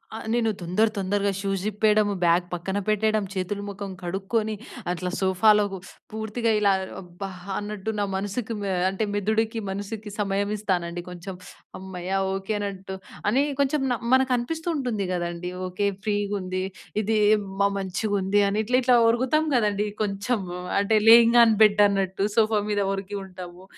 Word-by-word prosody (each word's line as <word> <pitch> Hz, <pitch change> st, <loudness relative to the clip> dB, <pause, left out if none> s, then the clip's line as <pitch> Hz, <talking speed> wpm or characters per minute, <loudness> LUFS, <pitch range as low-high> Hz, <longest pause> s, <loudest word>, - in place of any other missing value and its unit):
ఆ! -, -, -4 dB, 0.2 s
నేను 230 Hz, -2 st, +2 dB
దొందర 185 Hz, +6 st, +2 dB
తొందరగా 200 Hz, +1 st, 0 dB
షూస్ 195 Hz, -2 st, -2 dB
ఇప్పేయడము 210 Hz, 0 st, +2 dB
బ్యాగ్ 175 Hz, +1 st, +3 dB
పక్కన 190 Hz, +3 st, -3 dB
పెట్టేయడం 215 Hz, 0 st, +2 dB
చేతులు 200 Hz, +2 st, -3 dB
ముఖం 200 Hz, 0 st, -6 dB
కడుక్కొని 200 Hz, +5 st, -1 dB, 0.4 s
అట్లా 180 Hz, +1 st, -3 dB
సోఫాలో 210 Hz, +3 st, +4 dB, 0.2 s
స్ -, -, -12 dB, 0.2 s
పూర్తిగా 220 Hz, +2 st, -1 dB
ఇలా 200 Hz, -1 st, +4 dB, 0.3 s
అబ్బా! 180 Hz, +2 st, -8 dB, 0.3 s
అన్నట్టు 210 Hz, 0 st, -4 dB
నా -, -, +2 dB
మనసుకి 205 Hz, +4 st, -3 dB
మె 200 Hz, -, -2 dB, 0.2 s
అంటే 195 Hz, +3 st, -2 dB
మెదుడికి, 220 Hz, +2 st, 0 dB
మనసుకి 205 Hz, +2 st, -5 dB
సమయం 200 Hz, 0 st, 0 dB
ఇస్తానండి 175 Hz, -4 st, -2 dB
కొంచెం. 180 Hz, +2 st, -7 dB, 0.4 s
హమ్మయ్య! 190 Hz, 0 st, -3 dB, 0.2 s
ఓకె. 195 Hz, +2 st, -3 dB
అనట్టు 195 Hz, -1 st, -5 dB, 0.4 s
అని 255 Hz, +6 st, +3 dB, 0.2 s
కొంచెం 280 Hz, +1 st, +2 dB
న -, -, +2 dB, 0.2 s
మనకనిపిస్తూ 260 Hz, +5 st, +1 dB
ఉంటుంది 240 Hz, -8 st, -1 dB
కదండీ. 175 Hz, 0 st, -3 dB, 0.2 s
ఓకె. 195 Hz, +3 st, -1 dB, 0.2 s
ఫ్రీగుంది 200 Hz, -3 st, -1 dB, 0.4 s
ఇది 220 Hz, +1 st, +1 dB, 0.4 s
మ -, -, +5 dB
మంచిగా 195 Hz, +2 st, -2 dB
ఉంది 195 Hz, +2 st, +2 dB
అని 205 Hz, -, -1 dB
ఇట్లా 250 Hz, +2 st, +2 dB
ఇట్లా 250 Hz, 0 st, +5 dB
ఒరుగుతాం 260 Hz, +6 st, +2 dB
కదండీ! 210 Hz, -2 st, +1 dB, 0.2 s
కొంచెము 200 Hz, -2 st, -2 dB, 0.3 s
అంటే 205 Hz, +2 st, +2 dB
లేయింగ్ 235 Hz, +1 st, +8 dB
ఆన్ 225 Hz, -, +5 dB
బెడ్ 210 Hz, -1 st, +5 dB
అన్నట్టు 195 Hz, -1 st, -1 dB
సోఫా 215 Hz, -1 st, +4 dB
మీద 205 Hz, -1 st, 0 dB
ఒరిగి 195 Hz, +1 st, -5 dB
ఉంటాము. 180 Hz, -1 st, -10 dB
205 Hz, 145 wpm, -25 LUFS, 190-220 Hz, 0.4 s, లేయింగ్